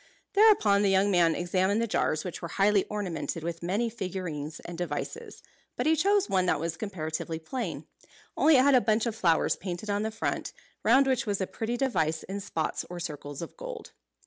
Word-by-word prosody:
Thereupon 400 - +5
the 200 - +3
young 195 +1 +3
man 170 -3 +4
examined 185 +4 +1
the 230 - +1
jars, 155 -7 0
which 180 - -5
were 170 - -4
highly 200 +3 +2
ornamented 165 -7 -4
with 170 0 -4
many 200 +7 0
figures 180 -8 -5
and 175 - -8
devices; 180 - -5 0.3
but - - -2
he 320 +1 +4
chose 400 +4 +2
one 185 -1 +1
that 160 - +2
was 165 +1 -2
comparatively 160 -5 -4
plain; 200 +11 -5 0.5
only 310 -2 +5
it 255 - +5
had 280 0 +5
a 255 - +6
bunch 220 0 +2
of 230 -2 -2
flowers 170 -7 +2
painted 185 +2 -5
on 205 0 0
the 220 - -1
front, 220 - -3 0.3
round 260 +5 +5
which 260 -4 0
was 200 -2 0
a 190 - 0
pretty 230 +5 -3
device 160 - 0
in 195 +1 -5
spots 180 -6 -3
or 175 0 -6
circles 145 -2 -6
of - - -9
gold. - - -8
195 Hz, 200 wpm, -28 LUFS, 165-230 Hz, 0.5 s, a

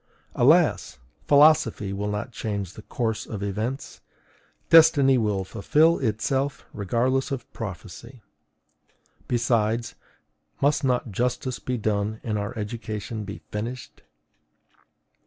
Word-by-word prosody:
Alas! - - +3 0.3
philosophy 140 -9 +4
will 100 +1 -3
not 105 +4 -4
change 100 -5 -4
the - - -11
course 115 -2 -3
of 105 -3 -5
events: 110 +7 -4 0.7
destiny 150 -5 +7
will 105 -5 0
fulfill 150 - +2
itself 135 +4 -1
regardless 120 +6 0
of 135 -4 -4
prophecy. 115 +4 -8 1.0
Besides, 115 -1 0 0.7
must 145 +1 +2
not 125 -3 0
justice 125 +3 -2
be 125 -1 -3
done 105 0 -1
and 105 -2 -2
our 105 +4 -5
education 110 0 -5
be 100 +2 -8
finished? 120 +4 -6
115 Hz, 105 wpm, -25 LUFS, 105-130 Hz, 1.0 s, destiny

